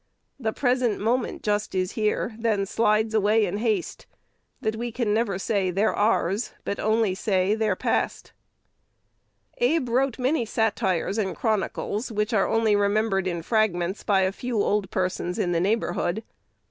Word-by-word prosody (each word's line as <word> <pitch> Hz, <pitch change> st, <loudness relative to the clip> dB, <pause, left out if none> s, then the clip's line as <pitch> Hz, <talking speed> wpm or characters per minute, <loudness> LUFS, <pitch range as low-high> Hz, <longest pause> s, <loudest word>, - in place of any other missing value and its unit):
The 220 Hz, -4 st, -1 dB
present 245 Hz, -3 st, +1 dB
moment 235 Hz, +4 st, -1 dB
just 210 Hz, -1 st, -1 dB
is 185 Hz, 0 st, 0 dB
here, 215 Hz, +1 st, -1 dB
Then 215 Hz, -4 st, +1 dB
slides 215 Hz, +1 st, +1 dB
away 215 Hz, 0 st, +3 dB
in 195 Hz, +1 st, -3 dB
haste, 215 Hz, -4 st, -2 dB, 0.5 s
That 220 Hz, 0 st, -1 dB
we 235 Hz, +1 st, -4 dB
can 225 Hz, -3 st, 0 dB
never 215 Hz, -3 st, 0 dB
say 195 Hz, -1 st, 0 dB
they're 195 Hz, +5 st, +1 dB
ours, 205 Hz, 0 st, +1 dB
But 200 Hz, -, -3 dB
only 220 Hz, -2 st, +2 dB
say 190 Hz, 0 st, +1 dB
they 220 Hz, 0 st, 0 dB
are 185 Hz, -, +1 dB
past." -, -, -2 dB, 1.3 s
Abe 330 Hz, -, +2 dB
wrote 260 Hz, +1 st, +1 dB
many 260 Hz, +1 st, +1 dB
"satires" 215 Hz, -3 st, 0 dB
and 190 Hz, -3 st, -1 dB
"chronicles," 220 Hz, +1 st, -2 dB
which 210 Hz, +2 st, -1 dB
are 195 Hz, -3 st, +3 dB
only 225 Hz, -2 st, +2 dB
remembered 205 Hz, -1 st, +1 dB
in 170 Hz, -2 st, -3 dB
fragments 190 Hz, -3 st, 0 dB
by 195 Hz, -2 st, +3 dB
a 190 Hz, 0 st, +2 dB
few 240 Hz, +2 st, -3 dB
old 205 Hz, -2 st, 0 dB
persons 180 Hz, -1 st, -2 dB
in 175 Hz, -, 0 dB
the 170 Hz, -1 st, +1 dB
neighborhood. 195 Hz, -1 st, 0 dB
215 Hz, 160 wpm, -25 LUFS, 195-225 Hz, 1.3 s, away